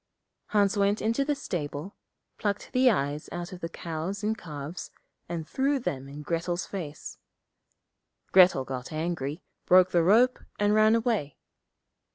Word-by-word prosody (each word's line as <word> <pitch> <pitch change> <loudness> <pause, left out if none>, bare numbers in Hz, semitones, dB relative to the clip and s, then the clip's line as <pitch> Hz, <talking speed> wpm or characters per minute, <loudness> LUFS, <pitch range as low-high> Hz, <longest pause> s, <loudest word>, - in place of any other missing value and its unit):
Hans 205 -1 +2
went 200 +1 +2
into 230 +5 +1
the 290 +1 0
stable, 165 - -5 0.4
plucked 205 -1 -2
the 255 0 +5
eyes 145 - -1
out 175 +1 -5
of 180 - -8
the 165 - -3
cows 170 +5 -5
and 215 +1 +1
calves, 150 -3 -7 0.4
and 165 -2 -4
threw 275 +2 +1
them 135 - -4
in 145 +2 -8
Grettel's 175 +2 -2
face. 160 -7 -7 1.1
Grettel 180 -8 +6
got 130 +1 -6
angry, 155 -1 -3 0.2
broke 185 0 +6
the 170 - +4
rope, 230 +9 +4 0.2
and 205 0 +2
ran 215 +1 +5
away. 225 - -1
180 Hz, 145 wpm, -28 LUFS, 155-215 Hz, 1.1 s, Grettel